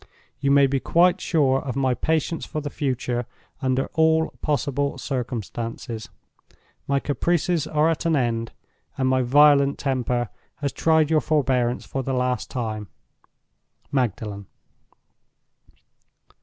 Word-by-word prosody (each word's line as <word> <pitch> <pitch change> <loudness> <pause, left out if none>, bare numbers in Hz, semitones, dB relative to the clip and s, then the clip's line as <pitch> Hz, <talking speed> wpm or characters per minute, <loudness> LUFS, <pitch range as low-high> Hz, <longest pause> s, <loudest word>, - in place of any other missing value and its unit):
You 140 - 0
may 140 0 +6
be 135 0 0
quite 175 +6 +3
sure 135 -5 +2
of 130 -3 -5
my 135 -2 +1
patience 160 +5 -1
for 155 - -4
the 145 -1 -5
future, 125 -3 -2 0.3
under 130 0 +1
all 160 0 +3
possible 145 -1 -1
circumstances. 115 -3 -4 0.8
My 140 0 +2
caprices 170 +4 0
are 155 +1 +2
at 165 0 0
an 165 - +3
end, 115 -4 -1 0.5
and 130 - +1
my 130 0 +3
violent 140 +2 +5
temper 125 -3 -1 0.3
has 140 -2 -3
tried 160 +1 +2
your 155 -1 +4
forbearance 125 -5 +1
for 135 - -3
the 130 +1 -3
last 125 -1 -1
time. 110 -4 -4 1.0
"MAGDALEN." 105 -6 -2
135 Hz, 125 wpm, -24 LUFS, 125-150 Hz, 1.0 s, may